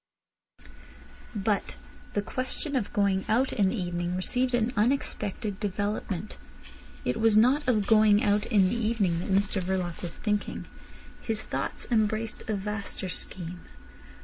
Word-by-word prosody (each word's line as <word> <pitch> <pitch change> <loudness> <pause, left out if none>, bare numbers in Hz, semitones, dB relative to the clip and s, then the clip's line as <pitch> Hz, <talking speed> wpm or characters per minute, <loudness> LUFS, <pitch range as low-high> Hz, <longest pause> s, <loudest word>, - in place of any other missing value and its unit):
But 205 0 0 0.4
the 205 - 0
question 260 +5 -3
of 240 -6 0
going 200 -2 +2
out 250 +5 +2
in 200 -3 +3
the 225 - -2
evening 175 0 -2
received 250 +7 +1
an 240 +1 +1
unexpected 210 -3 0
development. 205 -1 -3 0.7
It - - 0
was 220 -1 +5
not 260 +6 +4
of 215 -5 +3
going 215 -1 +5
out 205 0 +2
in 200 -5 +4
the - - -1
evening 215 -7 +1
that 180 - -5
Mr 195 0 +2
Verloc 180 -2 -2
was 170 -2 -5
thinking. 210 -1 -2 0.6
His 220 -2 -2
thoughts - - -3
embraced 220 0 0
a 215 - +1
vaster 200 -1 -3
scheme. 180 -1 -5
210 Hz, 140 wpm, -28 LUFS, 190-225 Hz, 0.7 s, was